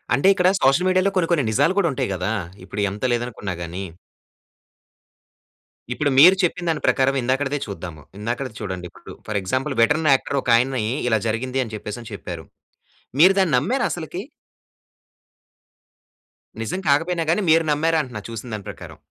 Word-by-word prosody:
అంటే 140 Hz, -, +2 dB
ఇక్కడ 180 Hz, -1 st, +3 dB
సోషల్ 140 Hz, +8 st, +3 dB
మీడియాలో 185 Hz, +1 st, +2 dB
కొన్ని, 180 Hz, -2 st, +1 dB
కొన్ని 155 Hz, -5 st, +3 dB
నిజాలు 145 Hz, -, +3 dB
కూడా 170 Hz, -, +2 dB
ఉంటాయి 130 Hz, -, -2 dB
కదా! 90 Hz, +4 st, -2 dB, 0.3 s
ఇప్పుడు 100 Hz, +2 st, -4 dB
ఎంత 105 Hz, +5 st, -4 dB
లేదనుకున్నా 120 Hz, -5 st, -3 dB
గాని. 90 Hz, +3 st, -5 dB, 2.1 s
ఇప్పుడు 145 Hz, +3 st, 0 dB
మీరు 180 Hz, +6 st, +9 dB
చెప్పిన 175 Hz, 0 st, 0 dB
దాని 160 Hz, -2 st, -1 dB
ప్రకారం 135 Hz, 0 st, +2 dB
ఇందాకటిదే 135 Hz, +3 st, 0 dB
చూద్దాం. 90 Hz, -5 st, -7 dB, 0.2 s
ఇందాకటిది 120 Hz, +3 st, -4 dB
చూడండి 95 Hz, -3 st, -5 dB
ఇప్పుడు -, -, -14 dB, 0.2 s
ఫర్ 105 Hz, -1 st, -1 dB
ఎక్సాంపుల్ 130 Hz, +9 st, -2 dB
వెట్రన్ 150 Hz, +5 st, +3 dB
యాక్టర్ 140 Hz, +1 st, 0 dB
ఒకాయన్ని 125 Hz, 0 st, +2 dB, 0.2 s
ఇలా 110 Hz, -2 st, +3 dB
జరిగింది 125 Hz, +4 st, -2 dB
అని 110 Hz, -3 st, -9 dB
చెప్పేసి 105 Hz, +1 st, -6 dB
అని 115 Hz, -, -11 dB
చెప్పారు. 85 Hz, -3 st, -7 dB, 0.8 s
మీరు 185 Hz, +5 st, +7 dB
దాన్ని 185 Hz, -6 st, +2 dB
నమ్మారా 240 Hz, -, 0 dB
అసలకి? 175 Hz, +2 st, -5 dB, 2.4 s
నిజం 115 Hz, -, -3 dB
కాకపోయినా 165 Hz, +4 st, +2 dB
గాని 195 Hz, -, +1 dB
మీరు 165 Hz, 0 st, +4 dB
నమ్మారా? 160 Hz, +2 st, +2 dB
అంటున్నా 120 Hz, -6 st, -8 dB
చూసిన 115 Hz, +2 st, -7 dB
దాని 105 Hz, -3 st, -6 dB
ప్రకారం? -, -, -10 dB
130 Hz, 150 wpm, -22 LUFS, 110-165 Hz, 2.4 s, మీరు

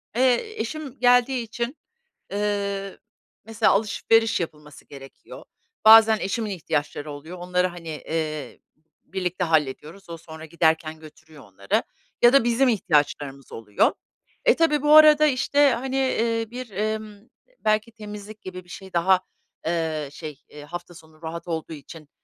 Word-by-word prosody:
Eee, 260 Hz, -, +1 dB
eşim 280 Hz, +2 st, -6 dB
geldiği 245 Hz, +1 st, +4 dB
için, 235 Hz, +5 st, -5 dB, 0.6 s
ııı, 200 Hz, -1 st, -2 dB, 0.5 s
mesela, 225 Hz, 0 st, +2 dB
alışveriş 225 Hz, +2 st, +2 dB
yapılması 150 Hz, -3 st, -8 dB
gerekiyor. 135 Hz, -1 st, -12 dB, 0.4 s
Bazen 220 Hz, 0 st, +8 dB
eşimin 215 Hz, +3 st, -2 dB
ihtiyaçları 150 Hz, -3 st, -3 dB
oluyor. 155 Hz, +5 st, -9 dB
Onları, 180 Hz, +1 st, 0 dB
hani, 175 Hz, -2 st, -9 dB
eee, 155 Hz, -3 st, -4 dB, 0.5 s
birlikte 180 Hz, -1 st, -3 dB
hallediyoruz. 160 Hz, +3 st, -1 dB
O 165 Hz, -, -6 dB
sonra 160 Hz, 0 st, -11 dB
giderken 160 Hz, -1 st, 0 dB
götürüyor 155 Hz, -1 st, -15 dB
onları 100 Hz, +1 st, -2 dB, 0.4 s
ya 240 Hz, +1 st, +6 dB
da 275 Hz, -4 st, +6 dB
bizim 240 Hz, +2 st, +2 dB
ihtiyaçlarımız 145 Hz, -, 0 dB
oluyor. 105 Hz, -2 st, +1 dB, 0.5 s
E, 485 Hz, -, +5 dB
tabii, 300 Hz, -3 st, +2 dB
bu 300 Hz, +1 st, +5 dB
arada, 305 Hz, 0 st, +8 dB
işte, 285 Hz, +1 st, +3 dB
hani, 265 Hz, +3 st, -3 dB, 0.2 s
ııı, 230 Hz, -1 st, -1 dB
bir, 220 Hz, -3 st, -3 dB
ımm, 215 Hz, +1 st, -11 dB, 0.3 s
belki 215 Hz, +1 st, 0 dB
temizlik 210 Hz, -1 st, -10 dB
gibi 185 Hz, -1 st, -8 dB
bir 175 Hz, -, -23 dB
şey 190 Hz, +1 st, -10 dB
daha, 185 Hz, +2 st, +3 dB, 0.4 s
eee, 160 Hz, -3 st, -2 dB
şey, 150 Hz, -2 st, -9 dB
eee, 150 Hz, 0 st, -11 dB
hafta 175 Hz, +2 st, -8 dB
sonu 160 Hz, -1 st, -18 dB
rahat 170 Hz, +1 st, -7 dB
olduğu 160 Hz, -1 st, -4 dB
için, 150 Hz, +1 st, -12 dB
190 Hz, 140 wpm, -24 LUFS, 160-230 Hz, 0.6 s, Bazen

